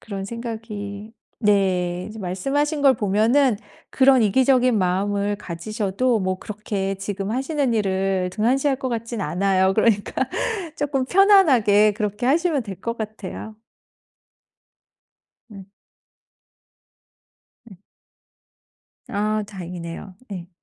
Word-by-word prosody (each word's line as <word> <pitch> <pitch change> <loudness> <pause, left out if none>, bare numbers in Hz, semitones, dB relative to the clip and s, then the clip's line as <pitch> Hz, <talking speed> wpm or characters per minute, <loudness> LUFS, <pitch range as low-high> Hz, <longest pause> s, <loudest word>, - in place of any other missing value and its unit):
그런 200 -3 -6
생각이 220 -2 -6 0.3
네 185 -4 +1
이제 215 +1 -10
말씀하신 280 - -1
걸 270 -2 +6
보면은 220 +5 +2 0.3
그런 265 -2 +5
이기적인 255 +2 +3
마음을 200 +2 0
가지셔도 210 +6 -2
뭐 185 0 -1
그렇게 205 -2 -4
지금 195 +1 -4
하시는 270 -1 0
일을 190 -2 0
등한시할 265 +7 +1
것 260 - -3
같진 230 -1 -4
않아요. 190 0 +1
그러니까 215 -3 +2 0.6
쪼끔 275 -2 -1
편안하게 260 - +5
그렇게 210 +2 -3
하시면 310 0 +2
될 195 -4 -8
것 230 0 -3
같아요. 215 0 -7 1.9
응. 195 -2 -12 2.0
음. 195 - -13 1.3
아 215 +1 -1
다행이네요. 180 -1 -8 0.2
예. 175 -2 -7
210 Hz, 235 characters per minute, -22 LUFS, 195-250 Hz, 2.0 s, 걸